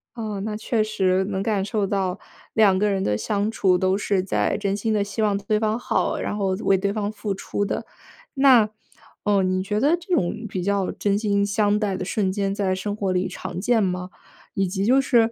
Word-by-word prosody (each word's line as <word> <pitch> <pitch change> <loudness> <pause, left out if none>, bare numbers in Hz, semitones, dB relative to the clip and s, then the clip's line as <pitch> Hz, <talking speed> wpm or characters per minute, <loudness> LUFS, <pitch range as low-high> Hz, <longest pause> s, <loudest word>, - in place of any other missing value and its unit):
哦， 215 -4 -4
那 210 -1 -3
确 220 0 0
实， 190 -3 +1
能 190 -1 -2
感 205 -3 0
受 200 0 -1
到 190 -1 -1 0.3
两 205 -4 +4
个 210 +2 +2
人 195 -1 0
的 105 - 0
相 205 - -1
处， 190 -5 +2
都 185 +2 +1
是 200 -2 0
在 185 - 0
真 200 -1 -1
心 215 +2 -1
地 205 - +2
希 205 +2 -4
望 205 -2 +2
对 205 +2 0
方 220 +1 0
好， - - 0
然 - - -2
后 195 -2 0 0.2
为 195 - +4
对 200 +1 -1
方 205 -1 -2
付 210 -1 -4
出 200 +1 -3
的。 200 - -3 0.5
那， 260 -6 +5 0.5
呃， 205 -2 +3
你 185 0 0
觉 210 +2 -1
得 295 +7 +4
这 350 +2 -5
种 220 - 0
比 185 -2 -3
较 200 -1 0
真 200 -1 0
心 200 -2 +1
相 205 +1 +1
待 205 -3 -1
的 185 - -4
瞬 190 +1 0
间， 195 0 -1
在 195 -2 0
生 205 +2 -3
活 200 -3 -1
里 180 +1 0
常 - - -6
见 235 0 +2
吗？ 180 -1 -2 0.4
以 195 -1 0
及 195 +2 -2
就 260 +4 +5
是， 230 -4 +3
200 Hz, 235 characters per minute, -23 LUFS, 190-215 Hz, 0.5 s, 那